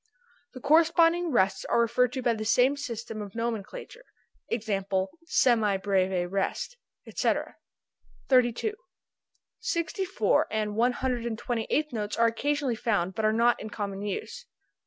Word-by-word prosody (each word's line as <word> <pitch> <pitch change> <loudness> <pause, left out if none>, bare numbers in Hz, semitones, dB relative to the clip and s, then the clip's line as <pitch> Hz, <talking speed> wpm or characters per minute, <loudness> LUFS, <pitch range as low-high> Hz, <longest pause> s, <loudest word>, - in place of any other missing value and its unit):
The - - -7
corresponding 330 +3 +4
rests 195 -7 +2
are 235 - +1
referred 235 +1 +2
to 260 - -4
by 240 -1 +3
the 215 -1 -4
same 250 +5 +3
system 230 -6 -6
of 205 -1 -8
nomenclature: 235 - -5 0.5
e.g., 220 -4 -1 0.5
semi 225 -10 +3
breve 190 -2 0
rest, 200 - -2 0.3
etc. - - -1 0.7
32. 255 - +2 0.9
Sixty 335 +4 -2
fourth 380 +2 +1
and 215 -1 -2
one 240 +3 +2
hundred 245 -2 -2
and 225 -2 -3
twenty 230 -2 -3
eighth 305 -2 0
notes 210 -2 -3
are 230 - +4
occasionally 275 +3 0
found, 205 -6 -1
but 220 +1 -1
are 215 - +4
not 235 +2 +2
in 215 - -6
common 200 -2 -5
use. 210 - -5
235 Hz, 145 wpm, -27 LUFS, 210-275 Hz, 0.9 s, corresponding